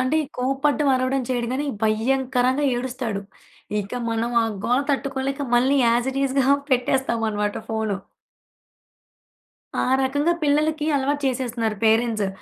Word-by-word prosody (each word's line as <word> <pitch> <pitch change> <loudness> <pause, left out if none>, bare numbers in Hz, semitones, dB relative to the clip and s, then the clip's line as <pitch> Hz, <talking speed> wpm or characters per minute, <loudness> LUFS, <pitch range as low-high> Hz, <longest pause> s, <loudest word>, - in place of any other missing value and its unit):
అంటే 255 +5 +2 0.2
కోపడ్డం, 275 +3 +1
అరవడం 255 +1 0
చేయడు 240 -2 -1
గాని 285 +3 -1 0.2
భయంకరంగా 255 +4 +1
ఏడుస్తాడు. 245 -5 -3 0.6
ఇక 200 +3 -9 0.2
మనం 230 +1 -1
ఆ - - +1 0.2
గోల 250 +3 +3
తట్టుకోలేక 275 0 -2 0.2
మళ్ళీ 265 +3 +3
యాస్ 235 +2 +2
ఇట్ 275 - -2
ఈస్‌గా 270 0 +1 0.2
పెట్టేస్తామనమాట. 230 -5 0
ఫోను. 220 -3 -1 1.8
ఆ - - +2 0.2
రకంగా 285 +6 +1
పిల్లలకి 305 +1 +1
అలవాటు 285 +1 0
చేసేస్తున్నారు 240 -4 -1
పేరెంట్సు. 220 -2 +2
255 Hz, 115 wpm, -23 LUFS, 230-275 Hz, 1.8 s, గోల